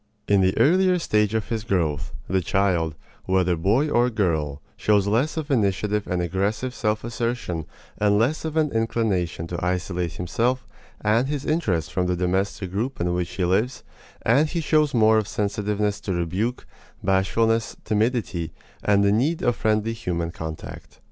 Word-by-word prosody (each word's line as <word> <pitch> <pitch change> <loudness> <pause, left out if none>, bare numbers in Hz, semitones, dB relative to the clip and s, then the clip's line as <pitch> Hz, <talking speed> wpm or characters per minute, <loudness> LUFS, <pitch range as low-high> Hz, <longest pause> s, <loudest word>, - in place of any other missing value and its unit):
In 100 -1 +4
the 95 0 +2
earlier 185 +4 +4
stage 105 - +1
of 110 - -1
his 110 -2 -2
growth, 85 -9 -1 0.2
the 95 +1 +1
child, 85 -5 +1 0.3
whether 95 -1 +2
boy 105 - +2
or 120 -4 +3
girl, 80 - 0 0.2
shows 105 -2 +2
less 120 +11 +1
of 155 -2 -3
initiative 105 -3 +1
and 90 -1 -1
aggressive 100 +8 -1
self 110 -3 -1
assertion 115 - -3 0.3
and 105 0 +3
less 130 +9 +1
of 160 0 -3
an 155 -2 +2
inclination 110 -7 0
to 85 0 -5
isolate 90 -1 -1
himself 120 +9 -1 0.4
and 115 +5 +2
his 145 -1 -3
interests 105 - 0
from 90 -1 0
the 90 - +1
domestic 95 +1 -1
group 115 +8 -2
in 85 0 0
which 90 -1 -1
he 90 0 0
lives, 105 +8 0 0.4
and 140 +7 +3
he 170 - -2
shows 155 -3 +2
more 110 -1 +5
of 105 - -3
sensitiveness 105 0 -1
to 95 - -3
rebuke, 95 +9 -2 0.4
bashfulness, 110 +4 +1
timidity, 105 -6 0 0.3
and 100 -1 +3
the 100 - +4
need 140 +10 +1
of 120 - +2
friendly 110 +1 +1
human 85 -7 -3
contact. 80 -1 -8
105 Hz, 160 wpm, -24 LUFS, 90-120 Hz, 0.4 s, more